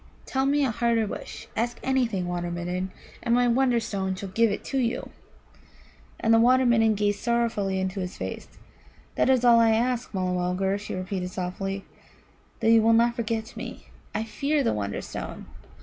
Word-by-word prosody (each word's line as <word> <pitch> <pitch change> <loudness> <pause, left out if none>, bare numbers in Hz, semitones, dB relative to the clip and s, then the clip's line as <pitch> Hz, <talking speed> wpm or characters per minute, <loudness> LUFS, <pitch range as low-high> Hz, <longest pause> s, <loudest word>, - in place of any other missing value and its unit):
Tell 265 0 0
me 285 0 +3
a 255 - 0
harder 230 0 +1
wish. 200 - -7
Ask 235 +2 -1
anything, 235 -9 0
Water 175 0 -2
midden, 180 +2 -3 0.3
and 235 - +2
my 245 0 +3
Wonderstone 230 -6 +1
shall 195 +1 -6
give 230 +4 +3
it 205 - -5
you." 250 -4 -1 1.1
And 225 - +3
the 225 - +6
Water 255 +2 +5
midden 225 -2 +4
gazed 205 0 0
sorrowfully 230 -5 0
into 190 +1 -2
his 180 -1 -5
face. - - -5 0.7
"That - - +2
is 255 -2 +3
all 235 -1 +7
I 230 -1 +5
ask, 245 +2 0
Mulla 185 -2 -1
mulgar," 180 +2 0
she 205 - -6
repeated 185 0 -3
softly 195 +2 -4 0.8
"that 225 0 +4
you 225 -1 +7
will 225 +1 +4
not 235 +1 +4
forget 225 -1 -3
me. - - -8 0.3
I 215 - 0
fear 280 +6 0
the - - +1
Wonderstone. 100 -1 -5
225 Hz, 170 wpm, -26 LUFS, 190-235 Hz, 1.1 s, all